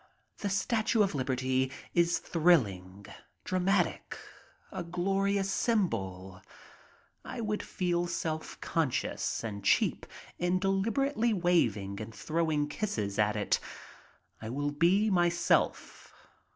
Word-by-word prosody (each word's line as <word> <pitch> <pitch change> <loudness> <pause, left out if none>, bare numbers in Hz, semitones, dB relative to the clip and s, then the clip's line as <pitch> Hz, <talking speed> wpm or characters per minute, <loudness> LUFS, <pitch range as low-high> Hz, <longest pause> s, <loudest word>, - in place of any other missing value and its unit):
The 205 - -2
Statue 220 +3 +2
of 195 - -1
Liberty 130 -1 0 0.2
is 170 0 +3
thrilling, 100 - +1 0.4
dramatic, 185 +2 0 0.5
a 190 - -4
glorious 195 +3 0
symbol. 95 - -1 0.8
I - - -7
would 215 -2 -1
feel 175 -1 -1
self 160 -2 -4
conscious 160 -7 -1
and 100 -3 -5
cheap - - +2 0.3
in 175 +1 +1
deliber 205 +9 +1
ately 230 -6 +1
waving 110 - +1
and 110 +1 -8
throwing 155 +5 0
kisses 110 - -3
at 105 0 +2
it. 105 - +1 0.8
I 110 - -6
will 145 +4 -2
be 185 +8 +3
myself. 175 -1 +1
170 Hz, 110 wpm, -30 LUFS, 115-195 Hz, 0.8 s, is